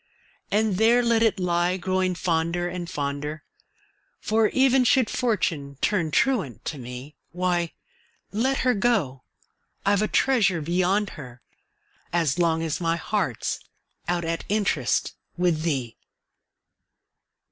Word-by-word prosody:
And 210 Hz, -2 st, +1 dB
there 235 Hz, +3 st, +4 dB
let 230 Hz, -1 st, +2 dB
it 220 Hz, -3 st, +2 dB
lie, 175 Hz, 0 st, +1 dB
growing 185 Hz, 0 st, 0 dB
fonder 170 Hz, 0 st, 0 dB
and, 175 Hz, -1 st, -5 dB
fonder 145 Hz, +2 st, -4 dB, 0.8 s
For, 220 Hz, 0 st, +2 dB
even 265 Hz, +1 st, +3 dB
should 250 Hz, 0 st, +3 dB
Fortune 165 Hz, -, -1 dB
turn 175 Hz, -6 st, +1 dB
truant 190 Hz, -, 0 dB
to 150 Hz, -, -4 dB
me, 125 Hz, +4 st, -9 dB
Why, 175 Hz, -1 st, -1 dB, 0.6 s
let 260 Hz, +6 st, 0 dB
her 250 Hz, -, +4 dB
go 200 Hz, -, 0 dB, 0.6 s
I've 200 Hz, 0 st, +3 dB
a 215 Hz, -, +1 dB
treasure 215 Hz, -11 st, +2 dB
beyond 185 Hz, +6 st, +1 dB
her, 125 Hz, -2 st, -12 dB, 0.7 s
As 165 Hz, -3 st, +1 dB
long 165 Hz, -1 st, +2 dB
as 160 Hz, +1 st, -2 dB
my 165 Hz, -1 st, +1 dB
heart's 170 Hz, -, -2 dB, 0.5 s
out 175 Hz, -1 st, 0 dB
at 165 Hz, 0 st, -2 dB
interest 195 Hz, -, 0 dB, 0.2 s
With 175 Hz, -3 st, +1 dB
thee! 135 Hz, -8 st, -2 dB
175 Hz, 125 wpm, -25 LUFS, 155-210 Hz, 0.8 s, there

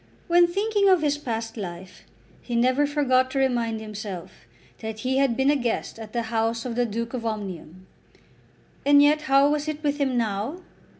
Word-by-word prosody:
When 345 Hz, 0 st, +5 dB
thinking 400 Hz, +2 st, +1 dB
of 365 Hz, -4 st, +4 dB
his 290 Hz, -1 st, +1 dB
past 225 Hz, -4 st, -4 dB
life 185 Hz, -2 st, -8 dB, 0.4 s
he 240 Hz, -, -5 dB
never 255 Hz, +5 st, +3 dB
forgot 260 Hz, -3 st, +2 dB
to 270 Hz, -, -4 dB
remind 240 Hz, -4 st, 0 dB
himself 210 Hz, -4 st, -7 dB, 0.5 s
that 220 Hz, -1 st, -6 dB
he 260 Hz, +1 st, 0 dB
had 270 Hz, -4 st, +2 dB
been 265 Hz, +2 st, +3 dB
a -, -, +2 dB
guest 240 Hz, -3 st, -2 dB
at 220 Hz, -1 st, -9 dB
the 235 Hz, 0 st, -1 dB
house 225 Hz, +1 st, 0 dB
of 245 Hz, -, -3 dB
the 245 Hz, +1 st, 0 dB
Duke 230 Hz, +2 st, -4 dB
of 245 Hz, -2 st, -4 dB
Omnium! 190 Hz, -5 st, -6 dB, 1.0 s
And 285 Hz, 0 st, +6 dB
yet 300 Hz, +1 st, +4 dB
how 275 Hz, +1 st, +5 dB
was 300 Hz, 0 st, -1 dB
it 310 Hz, 0 st, -4 dB
with 290 Hz, 0 st, 0 dB
him 265 Hz, -3 st, +1 dB
now? 225 Hz, -, -2 dB
250 Hz, 185 wpm, -25 LUFS, 225-290 Hz, 1.0 s, And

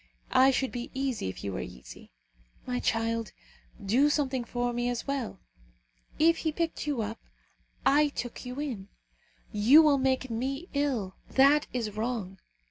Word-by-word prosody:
I 260 Hz, +1 st, +7 dB
should 265 Hz, 0 st, 0 dB
be 245 Hz, -1 st, -5 dB
easy 265 Hz, -, -1 dB
if 95 Hz, -, -8 dB
you 100 Hz, -, -3 dB
were 95 Hz, -, -3 dB
easy. 60 Hz, 0 st, -11 dB, 0.5 s
My 250 Hz, -1 st, -2 dB
child, 230 Hz, -1 st, -1 dB, 0.5 s
do 255 Hz, +9 st, +4 dB
something 270 Hz, -4 st, 0 dB
for 245 Hz, +1 st, -2 dB
me 240 Hz, +1 st, 0 dB
as 245 Hz, -1 st, -3 dB
well. 270 Hz, -8 st, -3 dB, 0.8 s
If 330 Hz, +1 st, +4 dB
he 320 Hz, -, -1 dB
picked 325 Hz, -1 st, -2 dB
you 270 Hz, -7 st, 0 dB
up, 220 Hz, +2 st, -5 dB, 0.7 s
I 290 Hz, +2 st, +5 dB
took 245 Hz, -4 st, -6 dB
you 250 Hz, +2 st, -6 dB
in. 240 Hz, -10 st, -4 dB, 0.6 s
You 250 Hz, +10 st, +7 dB
will 290 Hz, -3 st, +4 dB
make 260 Hz, -1 st, 0 dB
me 275 Hz, +9 st, -3 dB
ill. 260 Hz, -10 st, -1 dB
That 280 Hz, +3 st, +5 dB
is 230 Hz, -4 st, -2 dB
wrong. 215 Hz, -4 st, -3 dB
250 Hz, 155 wpm, -29 LUFS, 225-280 Hz, 0.8 s, I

